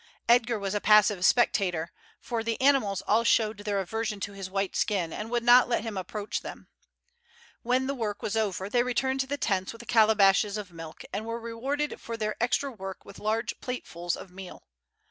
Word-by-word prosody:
Edgar 235 -1 +4
was 200 -1 -3
a 205 - -1
passive 210 -3 +5
spectator, 180 -7 +2 0.3
for 230 -2 -3
the 230 -1 -2
animals 260 -9 +2
all 220 +3 +2
showed 220 -2 +2
their 205 -1 -1
aversion 215 +2 -3
to 205 - -4
his 195 -1 -7
white 195 0 -2
skin, 180 -6 0
and 215 +1 -5
would 240 0 0
not 245 +1 +6
let 235 - 0
him 225 -3 -5
approach 205 +2 -4
them. - - -9 0.9
When 255 +2 +1
the 275 - -1
work 215 -6 -4
was 210 - -2
over 200 -3 -1
they 240 +4 +2
returned 265 +2 0
to 265 - 0
the 285 +1 -2
tents 190 -7 -1
with 230 - -13
the 235 - -10
calabashes 215 -2 +4
of 200 -4 -7
milk, 165 -1 -9
and 215 +3 -3
were 230 0 -3
rewarded 265 +6 -3
for 230 0 -5
their 215 -1 -2
extra 270 +3 +1
work 195 -5 -8
with - - -12
large 220 +1 -2
platefuls 175 -9 -4
of 185 - -11
meal. 190 0 -10
215 Hz, 200 wpm, -28 LUFS, 195-235 Hz, 0.9 s, not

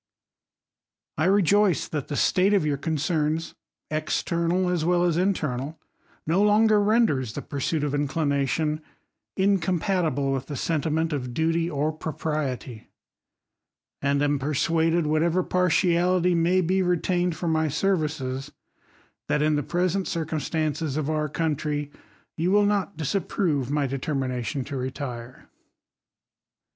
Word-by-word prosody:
I 155 - +2
rejoice, 200 0 +3
that 150 -4 -4
the 145 - -4
state 190 +7 +3
of 190 - +2
your 145 -2 +1
corrcerns, 155 +1 -1 0.4
external 170 +3 0
as 180 -3 0
well 175 +1 +2
as 175 -2 +2
internal, 155 -6 -1 0.5
no 170 +5 +2
longer 210 +1 +4
renders 205 - +2
the - - -5
pursuit 145 +2 -2
of 145 - 0
incU 145 0 0 0.2
1| 140 - +1
aation 150 +3 0 0.6
incompatible 180 -6 +1
with 135 -1 -2
the 145 - -5
sentiment 160 +2 -1
of 125 -4 -4
duty, 165 +1 +1
or 150 0 0
pro 155 0 -6
^ - - -22
priety; 135 -7 -3 1.2
and 140 +1 +1
am 145 -1 +1
persuaded, 160 +4 +1
whatever 165 +4 +2
partiality 180 0 +2
may 175 +2 +3
be 185 +2 +1
retaiiied 180 -1 +1
for 170 +2 -4
my 160 -1 +2
services, 150 -5 -1 0.8
that 150 - +1
in 155 0 +2
the 145 - +1
present 180 +5 -1
circum. 160 -2 -2
stances 155 -2 -2
of 155 0 -1
our 150 -1 -1
country, 150 -2 -2 0.4
you 170 +2 0
will 205 +1 +4
not 200 -3 0
disapprove 155 -3 -1
my* 145 0 +1
determination 130 -2 -2
to 140 +2 -6
retire. 130 -2 -6
160 Hz, 135 wpm, -25 LUFS, 145-180 Hz, 1.2 s, longer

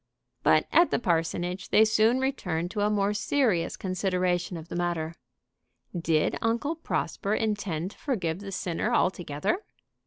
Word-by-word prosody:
But - - +4
at 345 +1 +5
the - - +1
parsonage 175 -1 -1
they 220 - +6
soon 220 +3 +3
returned 180 -11 -1
to 210 - -2
a 205 - +3
more 205 -1 +1
serious 210 -4 +1
consideration 180 -2 -1
of 160 0 -9
the - - -6
matter. 170 -2 -1 0.8
Did 165 -2 +1
Uncle 235 +7 0
Prosper 215 -9 -2
intend 200 -6 -2
to - - -17
forgive 185 - -1
the 200 -1 -7
sinner 185 +4 -2
altogether? 175 - 0
185 Hz, 145 wpm, -27 LUFS, 170-215 Hz, 0.8 s, they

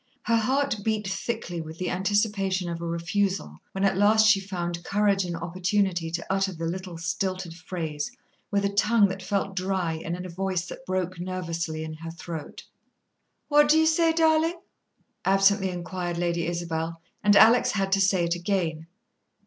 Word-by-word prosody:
Her 230 - +2
heart 265 +2 +1
beat 215 -2 -1
thickly 195 -3 -3
with 160 0 -9
the 185 - -2
anticipation 195 -1 0
of 170 0 -4
a 170 - -3
refusal, 170 - -1
when 195 - -3
at 195 -2 +3
last 215 +2 +5
she 210 -2 +6
found 175 -3 -4
courage 200 0 +2
and 175 -1 -3
opportunity 180 0 0
to 170 +1 -4
utter 195 0 +1
the 165 -1 -5
little 180 0 -4
stilted 175 +1 -2
phrase, 165 +1 -4 0.4
with 200 -1 +1
a 200 - -1
tongue 210 +1 +4
that 190 0 -5
felt 195 0 -2
dry 180 -4 -1
and 170 - -3
in 180 +1 -6
a - - -6
voice 185 0 -2
that 265 - -10
broke 185 -1 -2
nervously 170 -3 -3
in 160 0 -6
her 165 +1 -8
throat. 165 -2 -7 0.8
"What 295 0 +5
do 310 - +6
you 320 - +4
say, 325 +1 +4
darling?" 325 +1 +2 0.6
absently 195 0 +3
inquired 175 -1 -4
Lady 170 -1 0
Isabel; 165 -1 -3 0.2
and 205 0 +5
Alex 230 +4 +6
had 195 -2 0
to 195 0 +3
say 190 -2 +3
it 170 - 0
again. 170 -3 -2
185 Hz, 175 wpm, -26 LUFS, 170-205 Hz, 0.8 s, she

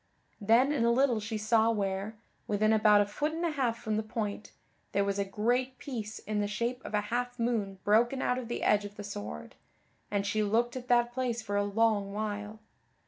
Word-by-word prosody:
Then 230 +6 +4
in 280 -6 +1
a 235 - +4
little 250 -2 +3
she 215 +1 -4
saw 220 +1 +3
where, 200 0 -2 0.3
within 215 +1 +2
about 210 -1 +5
a - - +2
foot 290 +10 -2
and 335 +2 -2
a 335 - +1
half 255 -6 0
from 215 -2 -2
the - - +1
point, 215 -1 -4 0.4
there 200 0 +2
was 200 0 -1
a - - +2
great 245 +6 0
piece 225 -5 -5
in 210 0 -3
the 205 - 0
shape 235 +4 -2
of - - -4
a 205 - +2
half 245 0 -1
moon 225 -5 -1
broken 235 +5 +3
out 250 -1 0
of 245 - -6
the 240 - -3
edge 210 -1 +3
of 205 0 -8
the 205 - -7
sword; 105 - -7 0.6
and 200 -1 -1
she 215 +2 0
looked 230 +4 +1
at 250 -1 -6
that 240 -1 +3
place 240 -3 -2
for 205 -2 -3
a 205 - +2
long 205 -1 +1
while. 210 0 -4
220 Hz, 215 wpm, -30 LUFS, 205-240 Hz, 0.6 s, about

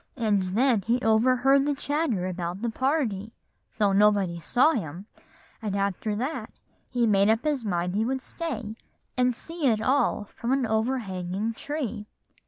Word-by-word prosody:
And 215 -5 +2
then 220 +5 +2
he 230 +6 +1
overheard 255 +5 +4
the 290 - +1
chatter 285 - -1
about 180 +2 -4
the 235 - 0
party, 235 -6 -1 0.4
though 205 -3 +3
nobody 200 -4 +3
saw 250 - +3
him; 180 - -4 0.6
and 210 -3 -2
after 200 +1 -1
that 260 +9 -3 0.4
he 245 -2 +1
made 200 -1 +4
up 225 +3 +2
his 295 -5 0
mind 180 -3 -1
he 210 +3 +1
would 265 +3 -1
stay 245 -8 -5 0.4
and 250 -1 +2
see 330 +2 -3
it 220 -3 +3
all 255 -1 +1
from 235 +4 -3
an 270 -2 +1
overhanging 220 -3 -1
tree." 240 -6 -4
225 Hz, 155 wpm, -26 LUFS, 200-260 Hz, 0.6 s, overheard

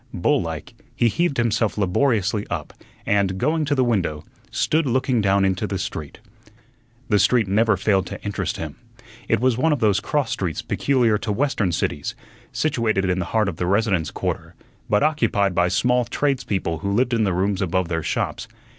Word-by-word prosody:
Bull - - +2
like, 80 -3 -6 0.2
he 120 - +3
heaved 170 +3 0
himself 115 -2 +1
laboriously 105 0 +1
up, - - -4 0.3
and, 100 -2 +1
going 155 +8 +1
to 145 0 +1
the 130 - +3
window, 95 -11 0 0.3
stood 155 -1 +1
looking 130 -1 +1
down 100 -1 +3
into 95 +2 0
the 100 - -2
street. 80 -5 -5 0.9
The 105 -2 +4
street 110 +3 +3
never 105 +1 +3
failed 95 -1 +1
to - - -7
interest 100 -2 -3
him. - - -6 0.5
It - - +2
was 125 -1 +1
one 160 +4 +3
of 145 - +1
those 105 -3 +3
cross 145 +6 -1
streets 85 -5 -2
peculiar 120 -6 +1
to 110 -1 -3
Western 115 -5 0
cities, 75 -3 -2 0.4
situated 115 -10 0
in 90 - 0
the 90 - -1
heart 110 +1 +1
of 90 -4 -3
the 90 - -1
residence 100 -5 +1
quarter, - - -4 0.3
but 105 - +3
occupied 115 -10 +1
by 90 0 +2
small 125 +6 +2
tradespeople 110 - -1
who 100 0 -2
lived 120 +4 +1
in 115 -2 +2
the 100 - +1
rooms 95 +2 0
above 95 -1 0
their 80 -1 -2
shops. - - -2
105 Hz, 180 wpm, -22 LUFS, 95-125 Hz, 0.9 s, The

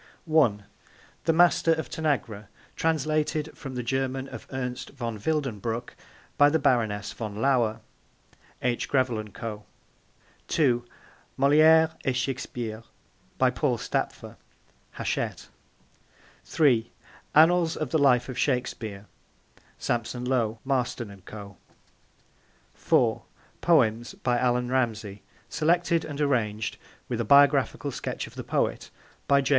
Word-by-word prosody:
(1) 140 -11 +3 0.6
The 165 - +4
Master 170 0 +4
of 160 0 -3
Tanagra. 125 -10 -2 0.3
Translated 155 0 0
from 135 -3 -8
the 125 - -3
German 130 +2 -2
of - - -9
Ernst 125 -1 -4
von 115 -5 -5
Wildenbruch 120 -4 -2 0.5
by 145 0 +7
the 160 - +2
Baroness 110 -8 0
von 105 -3 -6
Lauer. 115 -2 +1 0.8
(H. 120 -1 0
Grevel 130 -5 +1
and 105 -1 -7
Co.) 105 -2 -6 0.8
(2) 125 -6 +2 0.5
Moliere 155 +3 +6
et 130 -2 0
Shakespeare. 120 -4 -3 0.6
By - - +3
Paul - - 0
Stapfer. - - -3 0.6
(Hachette.) - - -3 1.0
(3) 120 -7 +2 0.5
Annals 165 +2 +5
of 155 -5 -3
the 160 - +2
Life 125 -3 +4
of 130 - -5
Shakespeare. 115 -6 -2 0.7
(Sampson 120 +1 -2
Low, 115 -4 0
Marston 125 -4 -1
and 100 -2 -14
Co.) 105 -2 -10 1.2
(4) - - +2 0.4
Poems 120 -8 +2
by 120 -1 0
Allan 125 -1 +1
Ramsay. 110 -6 -1 0.3
Selected 170 +1 +1
and 145 -1 -6
arranged, 115 -7 0 0.3
with 120 -1 -2
a - - 0
Biographical 140 +2 +4
Sketch - - -4
of - - -13
the - - -6
Poet, - - -1 0.4
by 140 0 +5
J. 135 - -2
125 Hz, 120 wpm, -26 LUFS, 115-145 Hz, 1.2 s, by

